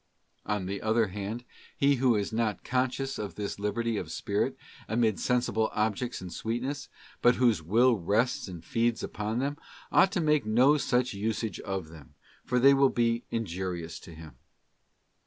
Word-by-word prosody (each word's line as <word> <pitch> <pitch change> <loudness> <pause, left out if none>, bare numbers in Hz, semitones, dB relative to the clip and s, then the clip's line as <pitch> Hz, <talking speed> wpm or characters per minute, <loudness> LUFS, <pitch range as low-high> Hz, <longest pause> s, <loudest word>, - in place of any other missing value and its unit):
267 105 - 0
On 95 - -5
the 100 +1 -4
other 110 0 +2
hand, 105 +4 -4 0.3
he 140 0 +3
who 125 -2 +3
is 105 +1 -1
not 110 -2 -1
conscious 130 +2 -1
of 105 -2 -5
this 100 -1 -4
liberty 110 +2 -1
of - - -5
spirit, - - -1 0.3
amid 110 -2 +1
sensible 120 -3 +1
objects 110 +3 -1
and 90 -2 -7
sweetness, 125 +5 -3 0.3
but 120 - +5
whose 120 -8 +3
will 115 +9 +4
rests 105 +8 0
and 85 -3 -9
feeds 115 -1 0
upon 105 +2 -3
them, 140 +3 -1 0.3
ought 195 - +5
to 200 - 0
make 150 -4 +3
no 125 +7 +4
such 125 -4 +1
usage 110 +2 -2
of 95 -5 -4
them, 80 -4 -14 0.3
for 125 - 0
they 135 +3 +7
will 135 0 +5
be 115 -1 0
injurious 90 -6 -4
to 85 - -12
him. 80 -5 -12
115 Hz, 170 wpm, -29 LUFS, 100-125 Hz, 0.3 s, they